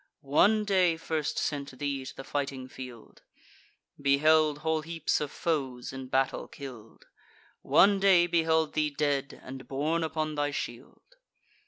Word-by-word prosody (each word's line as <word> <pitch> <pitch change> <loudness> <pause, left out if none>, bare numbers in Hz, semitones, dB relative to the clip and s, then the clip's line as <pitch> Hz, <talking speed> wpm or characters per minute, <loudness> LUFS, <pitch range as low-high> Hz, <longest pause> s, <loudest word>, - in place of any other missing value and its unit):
One 210 +7 +5
day 185 -5 +3
first 160 -2 -2
sent 140 -3 -3
thee 140 -1 -2
to - - -8
the 135 - -8
fighting 135 -2 -3
field, 125 -3 -11 0.8
Beheld 150 +2 +4
whole 160 0 +1
heaps 165 -1 -1
of 150 - -2
foes 135 -7 -2
in 130 -1 -7
battle 135 +1 0
kill'd; 120 -6 -11 0.6
One 200 0 +5
day 190 -3 +5
beheld 160 -2 +1
thee 155 -1 +1
dead, 140 -1 -1
and 130 0 -9
borne 155 +5 0
upon 155 -1 -2
thy 145 -1 0
shield. 140 - -7
150 Hz, 140 wpm, -29 LUFS, 135-160 Hz, 0.8 s, One